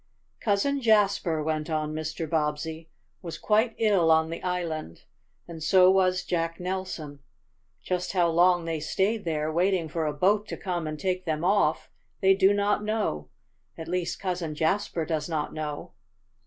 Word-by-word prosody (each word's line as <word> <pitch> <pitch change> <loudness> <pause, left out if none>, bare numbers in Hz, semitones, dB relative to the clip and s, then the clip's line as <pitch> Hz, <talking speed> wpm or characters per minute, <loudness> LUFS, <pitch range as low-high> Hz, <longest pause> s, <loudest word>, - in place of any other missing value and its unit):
"Cousin 235 +7 +1
Jasper," 200 -8 +2
went 155 0 -2
on 155 -1 -1
Mr. 155 +1 -4
Bobbsey, 160 +1 -2 0.3
"was 170 -3 -6
quite 220 +2 +1
ill 200 -7 +3
on 160 0 +3
the 165 - -5
island, 170 - -4 0.4
and 165 -2 -9
so 185 +4 +5
was 185 -1 +2
Jack 165 -1 -2
Nelson. 180 -6 -5 0.6
Just 180 0 -2
how 175 -3 +3
long 175 +1 +3
they 165 -1 -2
stayed 195 +7 -1
there, 155 -1 -1
waiting 180 0 +1
for 160 0 -2
a 150 - -1
boat 200 +7 +2
to - - -5
come 175 -4 -3
and 155 -1 -5
take 185 -1 -2
them 155 -1 -2
off, 200 +3 +1 0.3
they 195 -1 +5
do 190 0 +4
not 205 +1 +1
know 210 - -2 0.5
at 160 - -7
least, 180 0 -2
Cousin 180 -5 -3
Jasper 165 +1 0
does 160 0 -2
not 155 -2 -2
know." 150 -2 -5
170 Hz, 160 wpm, -27 LUFS, 155-190 Hz, 0.6 s, so